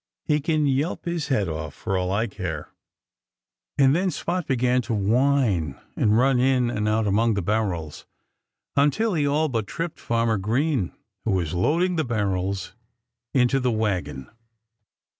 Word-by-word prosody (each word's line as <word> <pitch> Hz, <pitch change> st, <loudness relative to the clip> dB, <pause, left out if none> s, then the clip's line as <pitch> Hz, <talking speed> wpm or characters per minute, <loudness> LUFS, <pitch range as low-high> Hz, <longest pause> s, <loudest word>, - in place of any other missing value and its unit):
"He 150 Hz, 0 st, +1 dB
can 155 Hz, 0 st, +1 dB
yelp 140 Hz, +4 st, 0 dB
his 170 Hz, -3 st, -2 dB
head 105 Hz, -8 st, +1 dB
off, 80 Hz, -1 st, -5 dB
for 95 Hz, -3 st, -3 dB
all 90 Hz, 0 st, 0 dB
I 105 Hz, +4 st, +1 dB
care." 90 Hz, -8 st, -5 dB, 1.1 s
And 135 Hz, 0 st, +5 dB
then 185 Hz, +2 st, +1 dB
Spot 175 Hz, -1 st, -3 dB
began 125 Hz, -1 st, +2 dB
to 115 Hz, -1 st, -2 dB
whine, 105 Hz, -, +1 dB, 0.2 s
and 105 Hz, 0 st, +3 dB
run 130 Hz, +1 st, +3 dB
in 125 Hz, -2 st, +2 dB
and 105 Hz, -2 st, -1 dB
out 110 Hz, 0 st, +1 dB
among 110 Hz, +2 st, +2 dB
the 100 Hz, -, 0 dB
barrels, 90 Hz, -7 st, -2 dB, 0.7 s
until 150 Hz, +10 st, +2 dB
he 150 Hz, -4 st, +1 dB
all 150 Hz, +2 st, +2 dB
but 115 Hz, -7 st, -2 dB
tripped 165 Hz, +6 st, -4 dB
Farmer 115 Hz, -2 st, 0 dB
Green, 120 Hz, -, 0 dB, 0.3 s
who 110 Hz, -, 0 dB
was 85 Hz, -5 st, -1 dB
loading 170 Hz, -, +1 dB
the 160 Hz, -, +2 dB
barrels 100 Hz, -6 st, -2 dB, 0.6 s
into 130 Hz, +1 st, +3 dB
the 125 Hz, -1 st, +1 dB
wagon. 95 Hz, -, -2 dB
115 Hz, 155 wpm, -24 LUFS, 100-140 Hz, 1.1 s, And